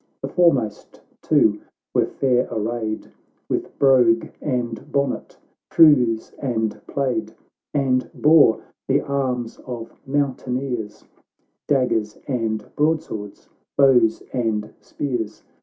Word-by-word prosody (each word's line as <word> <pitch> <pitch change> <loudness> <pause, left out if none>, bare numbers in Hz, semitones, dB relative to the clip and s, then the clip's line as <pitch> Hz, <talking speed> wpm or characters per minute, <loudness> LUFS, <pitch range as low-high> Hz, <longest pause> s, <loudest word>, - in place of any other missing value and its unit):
The - - -2
foremost 135 - +1 0.2
two - - +3 0.3
were - - +2
fair 125 -2 +1
arrayed, 110 0 -3 0.4
With - - -3
brogue 125 -4 +4
and 120 -5 -3
bonnet, 140 -2 -2 0.3
trews 125 -9 +5
and 110 -5 -2
plaid, 135 -3 -2 0.4
And 130 -3 +1
bore 150 -7 +5 0.2
the - - +2
arms 130 -4 -2
of 120 -3 -7
mountaineers, 130 -5 -2 0.6
Daggers 125 -6 +1
and 115 -5 -2
broadswords, 150 -10 -2 0.3
bows 125 -5 +4
and 110 -4 -1
spears. 120 -7 -4
125 Hz, 95 wpm, -22 LUFS, 115-140 Hz, 0.6 s, trews